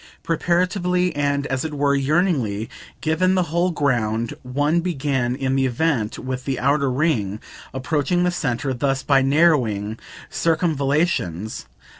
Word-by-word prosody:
Preparatively 180 +1 +1
and, 145 -1 0
as 135 -2 -2
it 155 -2 -4
were, 140 0 +2
yearningly 140 - 0 0.3
given 185 +4 +2
the 185 - +3
whole 175 +2 +2
ground 120 -8 0
one 145 +6 0
began, 135 -7 -1
in 135 -1 -1
the 135 -1 +2
event, 125 -4 0
with 130 0 -5
the 135 -2 -2
outer 140 +1 +2
ring, 125 -8 0 0.3
approaching 150 +6 0
the 180 - +2
centre 135 -4 -2
thus 135 +1 -1
by 140 -2 +4
narrowing 130 -8 +2 0.3
circumvallations. 145 - 0
140 Hz, 130 wpm, -22 LUFS, 125-165 Hz, 0.3 s, by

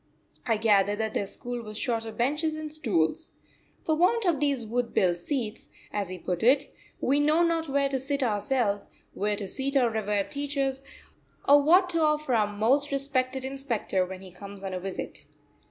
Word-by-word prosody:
I 225 -2 +2
gathered 205 -2 +3
that 220 0 -2
their 200 - -1
school 245 +4 -4
was 215 -2 -8
short 230 -2 -1
of 220 - -8
benches 300 +6 +1
and 310 -1 -6
stools. 220 - 0 0.5
"For 315 - +1
want 380 +8 +2
of 335 -6 +2
these 280 -5 0
wood 235 +2 -2
built 175 -2 +3
seats," 225 +3 -4 0.2
as 205 -3 -2
he 185 - -6
put 180 0 -3
it, 265 +5 +3 0.3
"we 280 +3 +2
know 305 +3 +3
not 330 -2 0
where 280 0 +2
to 270 -1 -1
sit 280 +1 -1
ourselves, 210 -2 0 0.2
where 205 +1 0
to 200 -1 -5
seat 275 +7 0
our 245 -3 +3
revered 210 -1 -1
teachers, 280 -2 -2 0.7
or 285 +1 +7
what 360 +6 +5
to 335 -1 +1
offer 300 -3 +1
our 215 -3 +3
most 240 +8 +2
respected 265 -1 -1
inspector 265 -8 -1
when 185 0 -7
he 190 -1 -11
comes 200 +2 -9
on 190 -1 -4
a 185 - -2
visit." 190 0 -6
250 Hz, 185 wpm, -27 LUFS, 205-285 Hz, 0.7 s, or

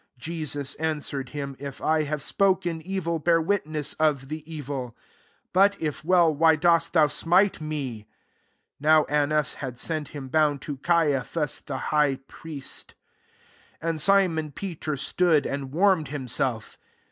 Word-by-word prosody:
23 165 +7 -5
Jesus 145 -3 -2
answer 155 -3 -2
ed 130 -1 -7
him, 140 -2 -5
" - - -36
If 140 -1 -7
I 155 0 +2
have 150 -1 -3
spoken 185 -4 +1
evil, 170 -2 -2
bear 165 +2 +3
witness 155 -4 -1
of, 145 -4 +1
the 155 0 -5
evil: 135 -5 -5 0.6
but 200 +2 +4
if 150 -3 -3
well, 170 -1 +4
why 160 +2 +5
dost 165 +1 +3
thou 160 -3 +6
smite 175 +6 +2
me 135 -9 -4 0.3
?" - - -45
24 155 0 +5
(JVbw - - -14
Annas 150 0 +1
had 130 -3 -6
sent 155 +1 -3
him 140 -3 -8
bound 150 0 +2
to 145 -2 -5
Caiaphas 150 -1 0
the 135 - -4 0.2
high 150 -2 +3
prlest) 150 -4 -7 0.9
25 165 - -1
And 160 -2 -1
Simon 175 -5 +3
Peter 155 -3 -4
stood 160 +1 +2
and 135 -1 -4
warmed 180 -1 +3
himself. 125 -4 -3
155 Hz, 160 wpm, -26 LUFS, 140-165 Hz, 0.9 s, thou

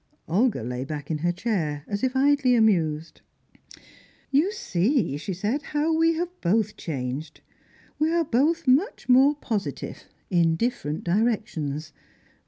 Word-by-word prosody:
Olga 205 - +1
lay 125 +2 -3
back 145 +2 -6
in 155 - -1
her 175 +3 +1
chair, 170 -7 -2
as 205 +2 -3
if 260 0 0
idly 270 -2 +4
amused. 165 -8 +1 1.1
"You 305 +8 +3
see," 225 - 0
she 160 - -5
said, 210 +10 -1
"how 300 +2 0
we 330 +1 +3
have 355 +2 -4
both 210 +4 +1
changed. 140 0 -5 0.6
We 310 +1 +2
are 335 -1 +2
both 295 +5 +1
much 290 - +2
more 265 +4 +6
positive, 220 -8 -4 0.3
in 170 -2 +3
different 160 -7 -2
directions. 170 -7 -1
215 Hz, 135 wpm, -25 LUFS, -, 1.1 s, more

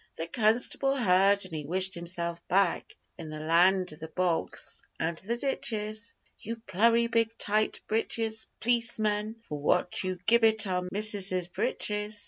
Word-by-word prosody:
The 165 - -4
constable 240 +7 +1
heard, 200 -4 +3
and 185 - -11
he 155 -1 -4
wished 185 +5 0
himself 170 0 -4
back 190 -1 +1 0.2
In 160 -2 -7
the 155 0 -7
land 180 +3 +3
of 155 - -14
the 160 - -7
bogs 175 0 -1 0.2
and 165 +1 -1
the 235 +5 -3
ditches 220 -4 -3 0.2
'You 230 +1 -3
plurry 230 +1 +2
big 230 -1 0
tight 215 +1 0
britches 220 0 -1
p'liceman, 220 -2 0
what 150 +4 0
for - - 0
You 185 -1 -3
gibbit 225 -1 +4
our 180 -1 -2
missuses 195 -4 +3
britches? 210 +3 -1
205 Hz, 145 wpm, -28 LUFS, 180-225 Hz, 0.2 s, gibbit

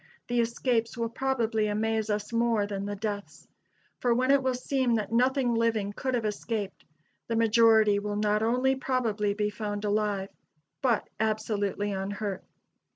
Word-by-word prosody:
] - - -36
the 240 0 +1
escapes 235 0 0
will 230 -1 0
probably 230 -4 0
amaze 220 +1 0
us 210 +2 -2
more 230 -3 +2
than 200 -1 -4
the 205 - -3
deaths; 205 0 -5 0.5
for 240 -2 +2
when 255 +2 +2
it 280 -1 +5
will 260 -1 0
seem 255 -1 0
that 215 -1 -2
nothing 250 +1 +2
living 225 -3 0
could 260 +3 -2
have 230 -2 -1
escaped, 210 -1 -3 0.4
the 230 - -1
majority 225 -2 +5
will 205 0 -3
not 210 0 +1
only 250 +4 +2
probably 230 -6 0
be 210 0 0
found 210 -1 -4
alive, 205 -2 0 0.5
but 240 -5 +1
absolutely 210 -2 -1
unhurt. 195 0 -3
220 Hz, 155 wpm, -28 LUFS, 205-235 Hz, 0.5 s, it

